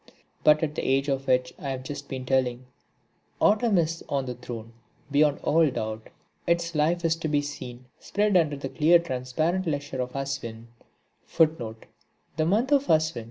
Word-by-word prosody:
But 150 +1 +5
at 150 -2 -1
the - - -3
age 135 +2 +1
of 135 0 -1
which 125 -1 +2
I 140 - -4
have 130 -1 -4
just 140 +1 -7
been 130 -1 -5
telling, 130 -1 0 0.7
Autumn 210 0 +3
is 165 0 0
on 140 -2 0
the 125 - -4
throne 115 -2 -8 0.4
beyond 145 0 +3
all 160 -1 +4
doubt. 110 -3 -5 0.4
Its 170 0 +1
life 165 +3 +1
is 165 0 +3
to 165 - -3
be 145 -1 +1
seen 130 -3 -7
spread 205 -1 0
under 155 -5 +3
the 135 -1 -5
clear 165 +4 +5
transparent 160 +5 -1
leisure 145 -3 -2
of 125 0 -4
Aswin. 120 -5 -5
140 Hz, 150 wpm, -26 LUFS, 130-165 Hz, 0.7 s, But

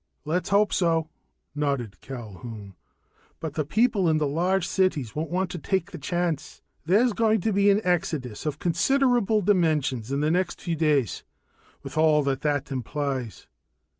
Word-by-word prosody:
"Let's 170 +4 -1
hope 205 +1 +3
so," 165 -3 +1 0.4
nodded 140 -8 -2
Culquhoun. 110 -4 -8 0.7
"But 160 -2 -5
the 155 - -1
people 205 - +2
in 155 - +3
the 155 - +1
large 175 +5 0
cities 185 - 0
won't 155 +2 -2
want 185 +1 -1
to 175 - -5
take 190 +2 -1
the - - -7
chance. 170 0 -3 0.2
There's 220 +6 +4
going 220 0 +2
to 220 +3 0
be 200 +1 +4
an 200 +1 +4
exodus 155 -8 -1
of 150 -1 -2
considerable 225 - +2
dimensions 150 - +1
in 140 +1 0
the 155 +1 +2
next 180 +2 0
few 170 -3 -2
days, 150 - +1 0.6
with - - -4
all 155 -2 +4
that 135 -1 -1
that 145 -2 -1
implies." 130 -2 -3
160 Hz, 160 wpm, -26 LUFS, 140-190 Hz, 0.7 s, There's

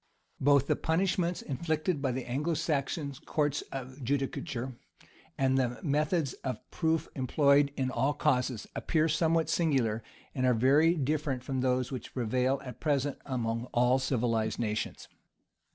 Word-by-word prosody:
Both 140 0 +4
the - - +2
punishments 180 +1 0
inflicted 155 +2 -1
by 135 -2 +1
the 130 0 -3
Anglo 150 +7 -1
Saxon 145 -1 -1
courts 145 -2 0
of 130 +1 -7
judicature, 135 -1 -2 0.6
and 135 0 +2
the 120 -2 -1
methods 150 0 +1
of 130 -1 -2
proof 160 -1 0
employed 140 +2 +3
in 130 -2 0
all 140 +2 +1
causes, 125 -6 +1
appear 160 -1 +1
somewhat 160 0 +2
singular, 135 -10 +1 0.3
and 130 -1 +1
are 125 - +4
very 145 +8 +4
different 145 -3 -1
from 130 -1 -2
those 125 0 +1
which 125 -3 -7
prevail 130 +2 +1
at 125 -3 -8
present 145 -2 0
among 115 -3 -2
all 125 +2 +4
civilized 115 -4 0
nations. 110 -2 -3
135 Hz, 140 wpm, -30 LUFS, 125-155 Hz, 0.6 s, Both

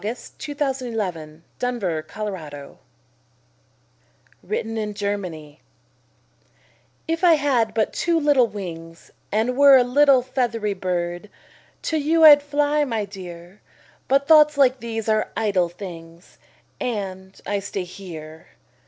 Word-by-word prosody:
SOMETHING 225 +4 -6
CHILDISH, 285 -2 -2 0.8
BUT 250 0 -1
VERY 170 -6 -2
NATURAL[313:1] 155 -8 -7 1.6
WRITTEN 225 - -4
IN 210 -1 -3
GERMANY 180 -8 -5 1.5
If 330 +2 -2
I 345 -2 +7
had 250 -7 0
but 220 -2 0
two 340 -1 +1
little 290 -5 +3
wings 170 -5 -9 0.2
And 225 +4 0
were 280 0 +8
a 250 - +4
little 265 +1 +4
feathery 235 -5 -1
bird, 175 0 -3 0.5
To 320 - -1
you 320 +2 +2
I'd 295 -2 +9
fly, 290 +1 +1
my 225 -6 -2
dear! 180 -1 -11 0.5
But 275 +1 +2
thoughts 300 -2 +6
like 260 -2 +3
these 225 -2 -5
are 215 0 +1
idle 195 -6 +1
things, 170 -2 -11 0.4
And 190 -5 -5
I 205 0 -1
stay 195 -1 -4
here. 165 -4 -10
215 Hz, 120 wpm, -22 LUFS, 185-275 Hz, 1.6 s, I'd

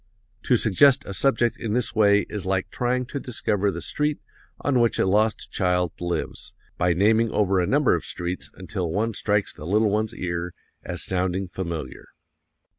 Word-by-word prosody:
To - - +4
suggest 140 +6 +4
a 100 - -6
subject 120 +1 +2
in 110 -3 -3
this 125 0 0
way 105 -2 +4
is 105 -3 -4
like 95 0 -1
trying 125 +1 -1
to 140 +3 -5
discover 110 -6 -1
the - - -4
street 150 0 -1 0.4
on 135 -3 +2
which 115 -1 +2
a - - +2
lost 105 +3 +1
child 90 -3 +1
lives, 85 0 -4 0.2
by 90 0 +2
naming 110 +5 +3
over 100 -3 +1
a 90 - 0
number - - +3
of - - -1
streets 90 +1 -4
until 90 -1 -4
one 110 +7 -1
strikes 105 0 0
the 75 - -9
little 105 +2 +2
one's 110 +2 -1
ear 85 -1 -4 0.3
as - - -3
sounding 95 +1 -1
familiar. 85 -7 -6
100 Hz, 175 wpm, -24 LUFS, 90-115 Hz, 0.4 s, To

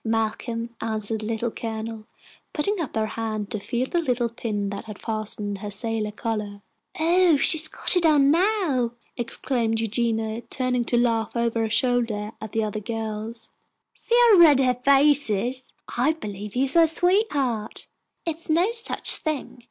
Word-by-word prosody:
"Malcolm," 230 +1 -2
answered 220 -1 -2
the 215 - -5
Little 230 +1 -2
Colonel, 220 -1 -6 0.5
putting 380 +5 0
up 295 - -5
her 220 -1 +1
hand 215 -2 -4
to 215 - -2
feel 240 +5 -2
the 340 +6 -1
little 245 -5 0
pin 210 -3 -3
that 210 +1 -7
fastened 215 -2 -4
her 210 - -6
sailor 215 +1 -2
collar. 210 -2 -4 0.4
"Oh, 345 +1 +4
she's 310 +2 +4
got - - +2
it 360 - +2
on 290 -3 +5
now!" 335 - +1 0.2
exclaimed 235 -1 -1
Eugenia, 225 0 -1
turning 250 -2 0
to 240 - +1
laugh 230 -2 0
over 235 -1 0
her 225 -1 0
shoulder 230 -3 0
at 220 - -7
the 225 - 0
other 215 0 -3
girls. 220 +1 -6 0.4
"See 475 - -2 0.2
how 395 - +7
red 300 -5 +7
her 255 -2 +3
face 280 -1 +5
is. 245 +6 -1 0.2
I 260 +6 +2
believe 210 -8 -7
he 255 - +1
is 275 0 +2
her 335 -1 +6
sweet 365 +7 +3
heart." 240 -7 -2 0.4
"It's 330 0 -4
no 345 +7 +3
such 460 -1 +1
a - - -17
thing!" 305 -5 -4
235 Hz, 170 wpm, -24 LUFS, 220-285 Hz, 0.5 s, how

